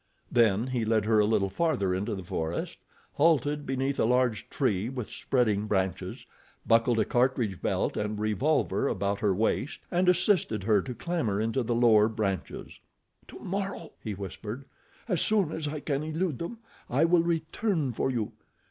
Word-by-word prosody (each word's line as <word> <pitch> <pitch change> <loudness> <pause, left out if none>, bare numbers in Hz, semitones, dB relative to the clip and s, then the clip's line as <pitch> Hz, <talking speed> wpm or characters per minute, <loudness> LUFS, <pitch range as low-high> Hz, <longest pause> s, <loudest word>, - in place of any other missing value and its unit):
Then 115 -2 +3
he 130 -3 -1
led 110 -1 +1
her 110 0 +3
a 105 - +4
little 100 -3 +1
farther 100 - +1
into 100 +4 -2
the 95 - -6
forest, 80 -1 -3 0.3
halted 145 -1 +2
beneath 135 +1 -1
a - - +4
large 125 -3 +1
tree 110 -6 0
with 125 -4 -5
spreading 110 -5 0
branches, 95 -3 -2 0.4
buckled 115 +1 +3
a 110 - +3
cartridge 120 -7 +1
belt - - 0
and 105 0 -2
revolver 120 +8 +1
about 100 -2 -1
her 105 - +2
waist, 115 - -1
and 180 +1 +3
assisted 180 - +2
her 105 -1 +3
to 125 +3 -6
clamber 120 - -1
into 115 +4 0
the 120 0 -1
lower 110 -3 +5
branches. 105 -4 -4 0.5
"Tomorrow," 195 -3 -5
he 105 -3 -4
whispered, 105 +6 -7 0.4
"as 180 -7 0
soon 200 -7 +2
as 160 -2 -3
I 150 +1 -3
can 140 -1 -1
elude 155 -2 -2
them, 200 +8 -5 0.3
I 140 +6 +3
will 170 0 +4
return 165 - -1
for 125 - 0
you. 115 -5 -2
120 Hz, 165 wpm, -28 LUFS, 105-155 Hz, 0.5 s, lower